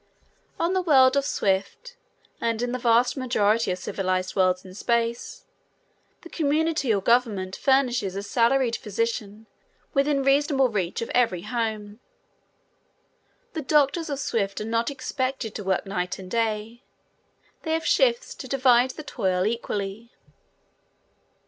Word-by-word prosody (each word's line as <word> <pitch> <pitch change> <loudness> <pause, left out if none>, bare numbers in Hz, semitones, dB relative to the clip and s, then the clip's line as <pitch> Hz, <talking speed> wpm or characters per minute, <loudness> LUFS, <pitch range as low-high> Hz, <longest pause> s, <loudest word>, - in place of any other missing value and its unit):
On 340 +2 +1
the 375 - +1
world 270 -6 +5
of 280 -1 +1
Swift 200 - -2 0.5
and 230 0 -1
in 245 - -1
the 255 - -3
vast 240 0 +3
majority 230 -5 +1
of 180 - -1
civilized 185 0 -2
worlds 185 -1 +2
in 185 - -11
space, 235 +3 -2 0.8
the 340 - -11
community 310 -4 0
or 200 -2 +1
government 210 -6 +1
furnishes 250 -8 +1
a 200 - -4
salaried 235 +2 +2
physician 220 0 -3 0.5
within 275 0 +2
reasonable 275 -1 +3
reach 195 -1 -2
of - - -6
every 225 -8 +1
home. 215 -2 -3 1.5
The 320 - -3
doctors 300 +3 +2
of 285 - -2
Swift 200 -7 -2
are 215 - -4
not 230 +2 0
expected 260 -4 -3
to 205 - -6
work 190 +2 0
night 180 -2 -3
and 185 -1 -10
day. 225 +1 -2 0.8
They 320 - -2
have 325 0 -1
shifts - - +2
to 260 - -9
divide 255 -1 +3
the 310 - -6
toil 185 -8 -1
equally. 215 0 -3
235 Hz, 135 wpm, -25 LUFS, 205-275 Hz, 1.5 s, world